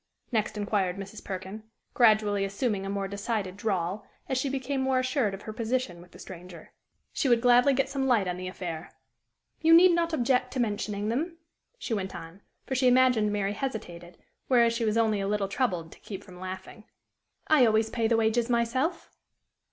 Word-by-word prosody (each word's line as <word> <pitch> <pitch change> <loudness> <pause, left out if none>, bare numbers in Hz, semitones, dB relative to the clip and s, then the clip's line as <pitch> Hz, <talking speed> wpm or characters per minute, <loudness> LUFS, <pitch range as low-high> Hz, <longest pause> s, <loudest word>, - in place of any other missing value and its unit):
next 220 -2 -1
inquired 200 -3 -1
Mrs. 200 +2 -8
Perkin, 190 +3 -6 0.3
gradually 215 -4 +4
assuming 200 0 -2
a - - -4
more 200 0 -2
decided 200 -1 -3
drawl 195 -1 -2 0.2
as 265 - -1
she 265 +2 0
became 270 0 -2
more 265 0 +1
assured 255 -5 0
of 195 - -12
her 215 - -6
position 225 -5 -2
with 180 - -16
the - - -15
stranger. 180 -2 -11 0.4
She 270 - 0
would 240 -1 +5
gladly 245 +3 +5
get 270 - +1
some 270 -1 -2
light 225 -7 +3
on 180 - -2
the 185 0 -5
affair. 175 -3 -6 0.7
"You 325 +1 +7
need 360 +2 +8
not 340 -1 +1
object 250 -3 +1
to 260 - -3
mentioning 210 -2 -1
them," 325 +9 -2 0.4
she 245 - -4
went 190 -3 -3
on, 170 +3 -10 0.2
for - - -4
she 260 0 +2
imagined 250 -4 +4
Mary 205 -1 -1
hesitated, 180 -8 -6 0.3
whereas 235 -3 +4
she 230 0 -1
was 215 +1 +1
only 220 -3 +2
a 195 - -2
little 205 -1 0
troubled 180 -8 -2
to - - -15
keep 200 -1 -8
from 180 -2 -13
laughing; 185 +3 -8 0.6
"I 285 -6 +5
always 220 0 +2
pay 230 -2 0
the 230 0 +2
wages 225 +2 +1
myself." 245 +8 0
220 Hz, 190 wpm, -28 LUFS, 195-250 Hz, 0.7 s, need